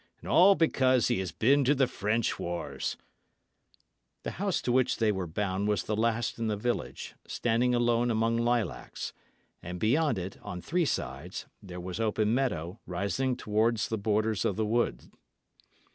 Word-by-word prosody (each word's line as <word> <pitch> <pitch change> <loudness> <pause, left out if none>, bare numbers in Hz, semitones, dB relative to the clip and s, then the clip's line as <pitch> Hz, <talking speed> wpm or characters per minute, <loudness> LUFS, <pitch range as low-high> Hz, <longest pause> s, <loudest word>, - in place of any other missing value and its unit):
And - - -11
all 190 +3 +6
because 130 - +3
he - - +1
has 95 -2 -3
been 140 - +3
to 140 +3 +3
the 135 -1 +4
French 110 -1 -1
wars!" 85 0 -3 1.3
The - - -3
house 200 -3 +1
to 125 - 0
which 130 0 +2
they 110 -2 +3
were 95 -3 -3
bound 95 +3 -1
was 105 -4 +1
the 105 - -2
last 115 +1 0
in 115 - -1
the 105 -1 -1
village, 120 +3 -3
standing 120 +1 +1
alone 120 0 +2
among 115 0 +1
lilacs; 120 -1 -1 0.5
and 90 +1 -6
beyond 130 - +2
it, 95 +1 -5
on 90 - -6
three 170 - 0
sides, - - -3 0.2
there 90 -2 -8
was 90 +3 -5
open 110 -1 +1
meadow 95 -8 -1
rising 100 +8 -1
towards 110 +2 +1
the 110 - -1
borders 110 -1 +1
of 100 - 0
the 110 - 0
wood. 110 - -1
110 Hz, 165 wpm, -29 LUFS, 100-120 Hz, 1.3 s, all